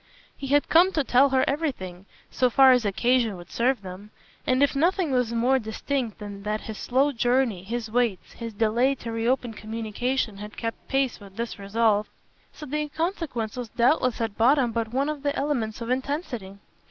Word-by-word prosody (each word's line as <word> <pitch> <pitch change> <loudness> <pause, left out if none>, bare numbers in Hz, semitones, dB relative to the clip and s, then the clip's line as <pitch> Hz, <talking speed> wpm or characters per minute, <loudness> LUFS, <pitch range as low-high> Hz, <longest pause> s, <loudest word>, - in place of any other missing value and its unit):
He 275 - -6
had 285 +2 +3
come 350 +4 +5
to 305 - +1
tell 265 +2 +4
her 260 -1 +2
everything, 200 - -3 0.2
so 255 - +2
far 265 +2 +7
as 250 -3 +3
occasion 230 +1 +1
would 175 - -12
serve 240 -2 +1
them; 190 +3 -9 0.4
and 255 +2 +3
if 285 - +2
nothing 340 +2 +2
was 250 -3 +1
more 245 +3 +2
distinct 230 +1 -3
than 205 -2 -8
that 210 +1 -2
his 220 -2 -7
slow 270 +4 +2
journey, 245 -6 +1
his 225 +2 -4
waits, 235 -5 0
his 230 -1 -7
delay 230 +5 +2
to 230 -3 -7
reopen 235 +1 0
communication 220 +1 -3
had 210 +1 -9
kept 230 -1 -5
pace 270 -2 0
with 200 -2 -14
this 235 -1 -4
resolve, 210 +1 +1 0.4
so 305 - -10
the 300 +2 -2
inconsequence 300 - -3
was 245 -3 -5
doubtless 250 +2 +2
at 225 -2 -3
bottom 250 +1 +4
but 225 -1 -2
one 270 +3 0
of 305 -2 -3
the 285 0 -1
elements 245 -7 -2
of 230 +1 -3
intensity. 255 - -3
240 Hz, 185 wpm, -25 LUFS, 220-270 Hz, 0.4 s, far